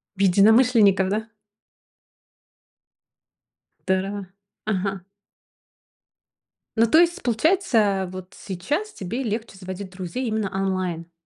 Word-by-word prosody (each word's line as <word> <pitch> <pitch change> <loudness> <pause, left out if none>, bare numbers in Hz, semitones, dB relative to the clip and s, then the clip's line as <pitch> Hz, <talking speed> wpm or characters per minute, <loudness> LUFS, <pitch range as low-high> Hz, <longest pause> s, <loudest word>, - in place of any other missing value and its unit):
В 195 - -5
единомышленников, 205 0 +5
да? 220 +2 -2 2.6
Тара 195 +1 -1 0.4
Ага. 195 -3 -2 1.7
Ну 230 +1 +5
то 320 - +6
есть 345 +2 +2
получается, 225 - +2
вот 185 0 -9
сейчас 290 - -3
тебе 230 +8 -4
легче 220 -2 -4
заводить 190 +1 -7
друзей 185 +7 -5
именно 215 -3 -1
онлайн? 185 -3 -2
200 Hz, 90 wpm, -23 LUFS, 190-230 Hz, 2.6 s, то